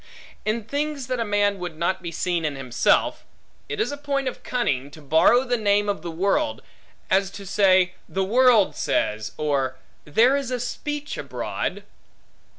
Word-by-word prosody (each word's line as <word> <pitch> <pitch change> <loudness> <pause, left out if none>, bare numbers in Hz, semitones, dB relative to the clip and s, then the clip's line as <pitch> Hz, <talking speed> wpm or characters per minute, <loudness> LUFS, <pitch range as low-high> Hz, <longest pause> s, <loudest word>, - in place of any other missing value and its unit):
In 215 +1 0
things 285 +3 -3
that 255 0 -2
a - - +1
man 205 -2 +1
would 175 -3 -6
not 180 +3 0
be 170 -2 -5
seen 175 0 -1
in 150 -2 -1
himself, 130 -3 +1 0.5
it - - -4
is 430 - 0
a 285 - -5
point 280 -2 -2
of 255 - -4
cunning, 140 - -1
to 150 - -13
borrow 160 - +4
the 245 -2 0
name 205 -1 +2
of 200 -5 -1
the 170 - -5
world; 195 - 0 0.5
as 195 0 +3
to 200 0 -10
say, 185 -1 +4 0.2
The 195 - -1
world 230 0 +4
says, 110 0 -1
or 140 -4 0 0.3
There 230 - +4
is 280 -3 -2
a 250 -1 -2
speech 295 +4 -4
abroad. - - -4
200 Hz, 170 wpm, -24 LUFS, 170-250 Hz, 0.5 s, borrow